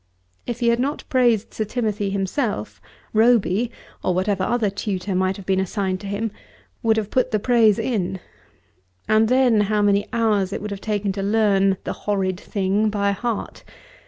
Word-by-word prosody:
If 240 0 -4
he 235 - +3
had 235 0 +2
not 280 +4 -1
praised 240 -5 +2
Sir 220 - -1
Timothy 210 -2 -2
himself, 200 +5 -2 0.3
Roby, 225 -1 +3 0.3
or 180 - +1
whatever 190 +1 0
other 220 -1 +1
tutor 200 -1 -3
might 185 +1 0
have 195 - -10
been 190 0 +1
assigned 190 0 -1
to 200 - -8
him, 205 +2 -2 0.5
would 220 -1 +2
have 215 -2 -2
put 255 - +2
the 215 - +1
praise 220 -1 +4
in. 190 -6 -2 0.9
And 220 +1 +4
then 250 -3 +4
how 210 0 +1
many 200 0 +2
hours 210 -5 +1
it - - -3
would 210 0 -6
have 200 -1 -6
taken 205 -2 -1
to 195 +1 -4
learn 195 -2 +2
"the - - -3
horrid 190 -3 -2
thing" 200 +2 0
by 200 -1 0
heart. 225 +2 -4
210 Hz, 175 wpm, -22 LUFS, 195-225 Hz, 0.9 s, praise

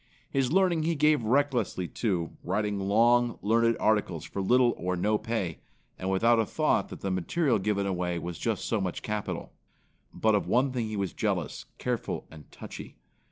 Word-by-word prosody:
His 135 -1 +1
learning 180 -2 +3
he 165 +1 0
gave 150 -3 +3
recklessly, 125 -6 +1
too, 90 -7 -1
writing 105 -1 -1
long, 115 +4 +3
learned 115 +2 +3
articles 105 -6 +1
for 100 - -4
little 120 +4 +4
or 90 +1 -2
no 105 +4 +1
pay, 100 -8 -3 0.4
and 95 - -2
without 115 +5 +3
a 110 - +2
thought - - +1
that - - -9
the 95 - -2
material 115 - +1
given 100 0 0
away 90 -2 -1
was 85 -1 -5
just - - -1
so 110 - 0
much 90 -2 -3
capital. 105 -1 -4 0.6
But 110 0 +1
of 105 - +1
one 130 +3 +2
thing 120 -3 -2
he 110 -1 -4
was 95 -2 -2
jealous, - - -2
careful - - -3
and 75 -2 -13
touchy. - - -9
110 Hz, 175 wpm, -28 LUFS, 95-120 Hz, 0.6 s, little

